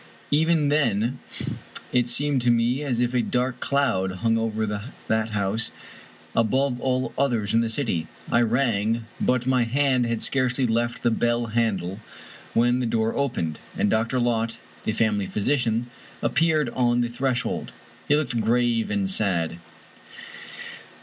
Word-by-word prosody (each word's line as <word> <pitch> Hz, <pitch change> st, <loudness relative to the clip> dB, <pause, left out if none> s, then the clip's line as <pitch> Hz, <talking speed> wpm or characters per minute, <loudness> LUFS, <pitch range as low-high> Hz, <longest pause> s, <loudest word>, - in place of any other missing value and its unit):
Even 155 Hz, 0 st, +3 dB
then 120 Hz, -5 st, +1 dB, 0.7 s
it 125 Hz, -1 st, +2 dB
seemed 140 Hz, +1 st, +3 dB
to 120 Hz, -, +2 dB
me 120 Hz, +3 st, +2 dB
as 125 Hz, -5 st, -1 dB
if 125 Hz, 0 st, +1 dB
a 125 Hz, -, +3 dB
dark 125 Hz, +1 st, -1 dB
cloud 115 Hz, -10 st, +1 dB
hung 115 Hz, +4 st, +1 dB
over 110 Hz, -1 st, 0 dB, 0.4 s
that 110 Hz, 0 st, +1 dB
house, 105 Hz, +1 st, 0 dB, 0.6 s
above 125 Hz, +3 st, +1 dB
all 130 Hz, 0 st, 0 dB
others 115 Hz, -7 st, +1 dB
in 115 Hz, -, +4 dB
the 115 Hz, -, -1 dB
city. 110 Hz, -, -1 dB, 0.2 s
I 115 Hz, -, +4 dB
rang, 115 Hz, -2 st, +1 dB
but 125 Hz, -1 st, +1 dB
my 130 Hz, -1 st, +3 dB
hand 130 Hz, 0 st, +2 dB
had 115 Hz, -1 st, -1 dB
scarcely 130 Hz, -1 st, +2 dB
left 120 Hz, 0 st, -1 dB
the 120 Hz, -, +3 dB
bell 120 Hz, +1 st, +1 dB
handle 100 Hz, -5 st, 0 dB, 0.6 s
when 120 Hz, +2 st, +3 dB
the 125 Hz, -, 0 dB
door 110 Hz, 0 st, 0 dB
opened, 85 Hz, -, -1 dB, 0.2 s
and 105 Hz, -, +2 dB
Dr. 115 Hz, +3 st, +1 dB
Lott, 115 Hz, -1 st, 0 dB, 0.3 s
the -, -, +1 dB
family 105 Hz, -3 st, +1 dB
physician, 120 Hz, +1 st, 0 dB, 0.4 s
appeared 155 Hz, -3 st, +2 dB
on 120 Hz, -1 st, +2 dB
the 120 Hz, -, +1 dB
threshold. 125 Hz, +1 st, -2 dB, 0.4 s
He 145 Hz, -, +4 dB
looked 140 Hz, -6 st, 0 dB
grave 115 Hz, 0 st, +1 dB
and 100 Hz, -2 st, 0 dB
sad. 90 Hz, -4 st, -1 dB
120 Hz, 145 wpm, -24 LUFS, 110-130 Hz, 0.7 s, in